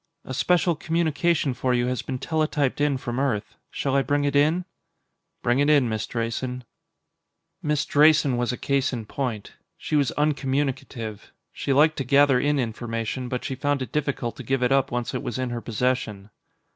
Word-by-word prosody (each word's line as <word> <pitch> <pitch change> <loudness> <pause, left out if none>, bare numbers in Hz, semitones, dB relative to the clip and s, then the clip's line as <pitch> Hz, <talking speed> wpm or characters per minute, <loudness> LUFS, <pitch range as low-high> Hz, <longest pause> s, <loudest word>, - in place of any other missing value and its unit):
"A 130 - -6
special 175 +5 +2
communication 160 -2 +1
for 125 0 0
you 120 0 +1
has 125 0 -1
been 130 - -4
teletyped 150 -2 0
in 145 -2 +2
from 120 -1 -4
Earth. 115 -6 -1 0.2
Shall 135 -1 -2
I 140 - +4
bring 145 +3 0
it 145 -1 0
in?" 155 +5 +3 0.8
"Bring 120 +2 +2
it 145 +1 +3
in, 145 -5 +5
Miss 110 -1 -2
Drayson." 125 +2 -3 1.0
Miss 150 -1 0
Drayson 150 -2 +4
was 120 0 0
a 125 - -4
case 140 -1 0
in 115 -3 -4
point. 115 -4 -4 0.2
She - - -3
was 140 -5 +2
uncommunicative. 135 -6 -2 0.2
She - - -3
liked 155 +3 +4
to 135 - -1
gather 140 0 +4
in 145 +2 +1
information, 115 0 -3
but 125 0 -3
she 135 - -2
found 140 +1 0
it 120 - -9
difficult 140 -5 -2
to 130 - -7
give 130 +2 0
it 125 - +2
up 135 0 +3
once 120 0 -2
it - - -2
was 120 - -4
in 130 -1 -2
her 120 -1 -3
possession. 110 -4 -2
135 Hz, 185 wpm, -25 LUFS, 120-145 Hz, 1.0 s, in